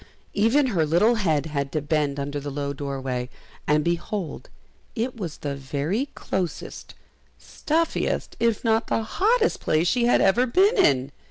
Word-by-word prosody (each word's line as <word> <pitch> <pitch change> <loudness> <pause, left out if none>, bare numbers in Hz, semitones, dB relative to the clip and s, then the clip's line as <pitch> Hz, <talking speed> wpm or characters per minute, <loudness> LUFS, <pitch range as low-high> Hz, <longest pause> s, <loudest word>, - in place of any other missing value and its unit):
Even 230 +8 +3
her 165 -4 +2
little 175 +10 +3
head 160 - +1
had 140 -3 -3
to 155 - +1
bend 145 -1 -1
under 145 +1 -3
the 145 +1 -5
low 140 0 -3
doorway, 135 -3 -4 0.4
and 150 0 +3
behold 170 +1 -3 0.5
it 245 +2 -2
was 180 -9 -6
the 140 -1 -4
very 145 - -2
closest, 180 -3 -4 0.4
stuffiest, 325 +2 -1
if 230 -2 +1
not 225 0 +2
the 225 - 0
hottest 445 - +1
place 155 +3 +1
she 245 +3 +2
had 240 - +4
ever 240 +7 +3
been 390 - +4
in! 135 0 +3
170 Hz, 155 wpm, -24 LUFS, 145-230 Hz, 0.5 s, had